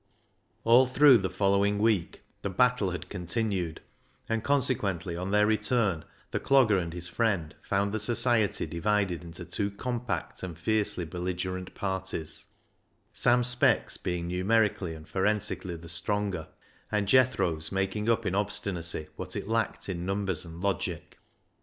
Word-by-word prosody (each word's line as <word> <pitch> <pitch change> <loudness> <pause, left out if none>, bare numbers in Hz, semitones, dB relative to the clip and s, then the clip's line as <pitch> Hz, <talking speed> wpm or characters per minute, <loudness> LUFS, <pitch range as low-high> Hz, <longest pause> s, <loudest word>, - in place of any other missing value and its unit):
All 120 +3 +6
through 130 -1 +6
the 95 -1 -2
following 100 +2 +2
week 105 -5 0 0.2
the 100 - -2
battle 125 0 +2
had 90 - -5
continued, 90 -2 -2 0.5
and 115 -1 -1
consequently, 105 -11 0
on 90 +2 -4
their 105 +1 +4
return, 105 -5 +1 0.3
the - - -1
Clogger 120 -9 +4
and 85 -1 -5
his 85 +1 -6
friend 95 -7 0
found 100 +1 0
the 110 - 0
society 115 -1 +2
divided 95 -1 0
into 85 +1 -8
two 100 +3 -1
compact 120 +4 -4
and 85 -3 -6
fiercely 105 0 0
belligerent 90 +2 -4
parties, 95 -5 -3 0.7
Sam 125 0 +4
Speck's 125 0 +3
being 90 -1 -3
numerically 95 -1 +1
and 80 -1 -12
forensically 95 -1 -1
the 85 0 -10
stronger, 90 +1 -1 0.4
and 105 -1 0
Jethro's 105 -11 +3
making 95 +3 -1
up 115 - +2
in 90 - 0
obstinacy 95 -5 -1
what - - -6
it - - -4
lacked 115 0 -1
in 90 -3 -3
numbers 95 -2 -1
and 85 +1 -10
logic. 90 -3 -3
100 Hz, 140 wpm, -28 LUFS, 90-110 Hz, 0.7 s, All